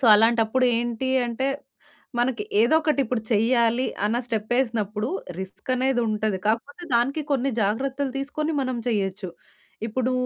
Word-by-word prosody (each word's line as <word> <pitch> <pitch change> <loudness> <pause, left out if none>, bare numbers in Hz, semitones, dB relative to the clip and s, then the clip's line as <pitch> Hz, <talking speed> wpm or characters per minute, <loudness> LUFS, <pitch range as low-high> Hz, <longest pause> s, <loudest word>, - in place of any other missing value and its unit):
So, - - 0
అలాంటప్పుడు 225 +3 +4
ఏంటి 240 +2 -2 0.2
అంటే, 240 +3 -2 0.7
మనకి 240 -3 0 0.2
ఏదోకటిప్పుడు 275 -3 +2
చెయ్యాలి 235 +3 +3 0.2
అన్న 220 +3 +1
స్టెప్పేసినప్పుడు 220 -2 -1 0.3
రిస్కనేదుంటది. 220 -1 -1
కాకపోతే, 280 +9 -1
దానికీ 270 +6 +2
కొన్ని 275 0 +1
జాగ్రత్తలు 265 +6 -1
తీసుకొని 305 +3 -2
మనం 255 -1 -2
చెయ్యచ్చు. 195 -3 -1 0.6
ఇప్పుడూ 255 +3 0
240 Hz, 105 wpm, -24 LUFS, 220-265 Hz, 0.7 s, అలాంటప్పుడు